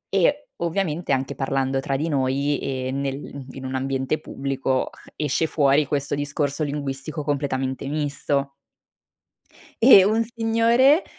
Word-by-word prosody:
e 285 - +2
ovviamente 170 -2 -1
anche 135 +1 0
parlando 135 0 -1
tra 135 0 -2
di 155 +4 -1
noi 140 0 0
e 130 -1 -3
nel 140 0 -4
in 130 0 -8
un 130 - -4
ambiente 135 +3 -1
pubblico, 135 -2 -2 0.2
esce 150 +2 0
fuori 145 -1 +3
questo 140 -1 -2
discorso 145 +1 -1
linguistico 145 +1 -4
completamente 135 -2 -2
misto. 145 -1 -1 1.3
E 225 -6 +9
un 220 +2 +2
signore, 235 - +3
140 Hz, 125 wpm, -23 LUFS, 135-160 Hz, 1.3 s, E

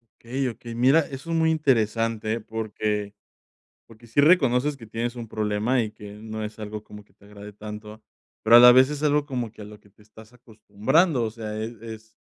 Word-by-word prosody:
Okey, 130 +3 -3
okey, 115 0 -9
mira, 130 +6 +4
eso 145 +1 -5
es - - 0
muy 160 0 +2
interesante, 115 -6 0
eh, 115 - -2
porque 105 -2 -3 0.7
porque 115 +1 -17
sí 115 +5 +1
reconoces 145 -3 +3
que 115 - -12
tienes 115 +2 -4
un 120 -2 -7
problema 110 +4 0
y 110 - -3
que 105 -1 -12
no 110 +1 -7
es 105 +1 -7
algo 105 0 -7
como 105 -1 -13
que 105 - -32
te 100 - -23
agrade 105 0 -12
tanto, 105 +1 -10 0.4
pero 115 +2 +8
a - - +10
la 125 0 +10
vez 130 +3 +5
es 150 -1 -5
algo 150 -1 +2
como 125 -5 -4
que 105 - -12
a - - -9
lo 105 0 -13
que 105 - -24
te 105 +1 -24
estás 110 +1 -17
acostumbrando. 125 - 0
O 110 - -2
sea, 110 -1 -6
es 115 +2 -5
es 110 -1 -11
115 Hz, 215 wpm, -24 LUFS, 105-125 Hz, 0.7 s, a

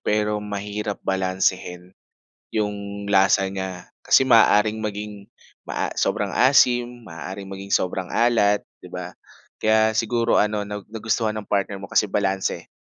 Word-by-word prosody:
pero 105 0 0
mahirap 105 0 -4
balansehin 95 -1 -1 0.6
'yong 100 -1 -3
lasa 95 -1 +4
niya 95 -2 -5 0.2
kasi 130 - +4
maaaring 110 -2 +4
maging 105 -1 -6 0.3
maa - - -3
sobrang - - -1
asim, 120 -2 +3
maaaring 95 +4 -7
maging 95 0 -8
sobrang 90 -1 0
alat, 110 -4 +2 0.2
'di - - -12
ba. - - -7 0.5
Kaya 110 0 +3
siguro 115 +1 +2
ano 105 -1 -1
nag 105 0 -7
nagustuhan 110 -1 -1
ng 105 - -8
partner 100 0 -1
mo 95 - -8
kasi 100 0 +1
balanse, 95 -1 -1
105 Hz, 130 wpm, -23 LUFS, 95-110 Hz, 0.6 s, lasa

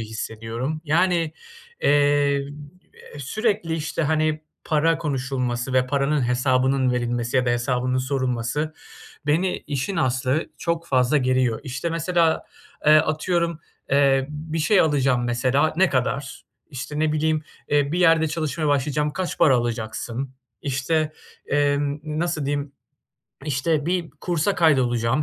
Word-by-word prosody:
hissediyorum. 115 +6 -4
Yani, 165 0 +2 0.5
eee, 145 -1 +3 0.7
sürekli, 200 - -1
işte, 160 +1 -2
hani, 155 0 +1 0.2
para 160 +1 +2
konuşulması 130 -4 -2
ve 130 0 +3
paranın 140 -1 +1
hesabının 130 +1 +2
verilmesi 120 +1 -1
ya 125 -1 +2
da - - +3
hesabının 125 +1 0
sorulması, 130 +3 -1 0.5
beni 170 +5 +1
işin 145 +6 -2
aslı 130 0 0
çok 170 0 -2
fazla 130 +1 +2
geriyor. 130 -3 +1
İşte, 140 +4 -4
mesela, 165 0 +1 0.4
eee, 150 - +8
atıyorum, 170 +1 0 0.3
eee, 135 -1 +3
bir 155 +2 -5
şey 185 +6 +4
alacağım 135 -5 +2
mesela, 130 +5 +1
"Ne 190 +1 +4
kadar?" 135 +1 -2 0.3
İşte, 135 +2 -6
ne 155 0 +1
bileyim, 155 0 +1 0.3
eee, 145 0 +2
bir 175 - 0
yerde 165 -2 +4
çalışmaya 155 -1 -2
başlayacağım, 145 +1 +1
"Kaç 185 +1 -3
para 135 -5 +5
alacaksın?" 120 +2 -3 0.3
İşte, 150 +3 0 0.3
emm, 145 0 +1
nasıl 155 -1 -2
diyeyim, 145 0 -2 0.7
işte 150 +2 0
bir 175 -2 -1
kursa 175 +2 -1
kaydolacağım, 130 -4 +2
145 Hz, 125 wpm, -23 LUFS, 130-160 Hz, 0.7 s, eee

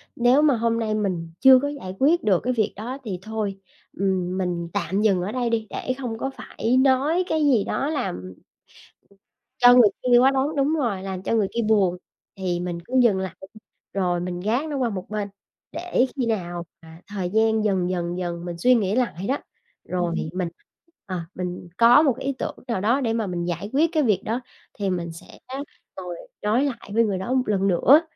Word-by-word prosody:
nếu 245 +4 +4
mà 300 -3 +4
hôm 230 0 0
nay 220 -2 -1
mình 180 -6 -2
chưa 265 -1 +8
có 285 - -1
giải 275 -11 -6
quyết 315 +6 +3
được 195 -5 +3
cái 255 - 0
việc 220 -4 0
đó, 240 +6 -5
thì 195 -6 -4
thôi, 210 -2 -4 0.3
ừm, 185 -1 -1
mình 175 -2 -2
tạm 190 +5 -1
dừng 200 -4 +3
ở 190 +4 -3
đây 245 0 -1
đi 225 -1 -1
để 255 - -3
không 245 -4 -4
có 270 - -2
phải 240 +3 -1
nói 280 +7 +3
cái 315 -3 +1
gì 250 -8 +4
đó 275 - -1
làm 95 - -3 1.3
cho 245 0 +8
người 245 -4 +7 0.2
kia 245 -1 +6
quá 265 +2 +5
đáng 275 +3 0
đúng 285 +2 +2
rồi, 230 -11 -1
làm 190 -1 -4
cho - - -1
người 210 -3 +2
kia 235 - 0
buồn. 195 -5 +3 0.4
Thì 185 -3 -2
mình 175 -1 -3
cứ 250 - -12
dừng 225 -6 +4
lại, 190 -3 -4 0.6
rồi 180 -3 0
mình 175 0 -4
gác 230 - 0
nó 290 - -2
qua 250 -3 +1
một 190 -3 -6
bên, 210 -1 -2 0.4
để 345 -7 +1
khi 260 -4 0
nào 175 -6 -2 0.2
mà 160 0 -14
thời 195 -3 -3
gian 220 +2 +2
dần 190 -4 +1
dần 175 -1 -2
dần 175 -1 -4
mình 175 -1 -5
suy 250 +9 +4
nghĩ 205 -3 +1
lại 235 -8 -1
đó, 275 - +1 0.5
rồi 175 -2 -2 0.2
mình, 180 -2 -2 0.6
à, 185 -4 -4
mình 180 -1 -5
có 235 +5 +7
1 270 -6 +2
ý 275 +1 -2
tưởng - - -3
nào 230 -6 -1
đó 240 +7 +2
để 230 -3 0
mà 225 -2 -1
mình 175 -2 -3
giải 175 +4 -3
quyết 315 +5 +3
cái 310 -3 +2
việc 215 -7 +2
đó, 230 +4 -1 0.4
thì 200 -1 0
mình 175 -2 -2
sẽ 165 - -13 0.6
ngồi 180 -2 -5 0.3
nói 220 +6 +2
lại 240 -7 -5
với 230 +2 +4
người 205 -4 0
đó 190 +7 -3
1 260 -1 +2
lần 195 -2 +1
nữa, 245 - +6
215 Hz, 210 wpm, -24 LUFS, 180-250 Hz, 1.3 s, chưa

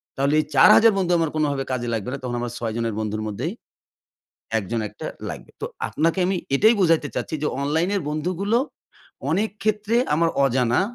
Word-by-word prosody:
তাহলে 140 +2 +1
এই 155 - 0
৪০০০ 225 -2 +7
বন্ধু 180 -2 0
আমার 160 -2 +1
কোনভাবে 145 -3 0
কাজে 120 -1 -2
লাগবে 110 +1 -3
না। - - -3
তখন 120 -1 -3
আমার 120 -1 -3
৬ 115 -2 -3
জনের 115 -2 -1
বন্ধুর 110 0 -2
মধ্যেই 130 - -3 1.1
একজন 110 +3 -3
একটা - - -7 0.2
লাগবে। - - -8
তো - - -1 0.2
আপনাকে 165 +4 0
আমি 190 +1 0 0.2
এটাই 220 +9 +5
বুঝাইতে 165 -4 +3
চাচ্ছি 155 - -2
যে, 150 - +1
অনলাইন 160 +5 +1
এর 195 - 0
বন্ধুগুলো 185 +8 0 0.7
অনেক 205 +7 +1
ক্ষেত্রে 215 +1 0 0.2
আমার 165 +1 +2 0.2
অজানা। 125 0 +2
155 Hz, 175 wpm, -23 LUFS, 120-185 Hz, 1.1 s, ৪০০০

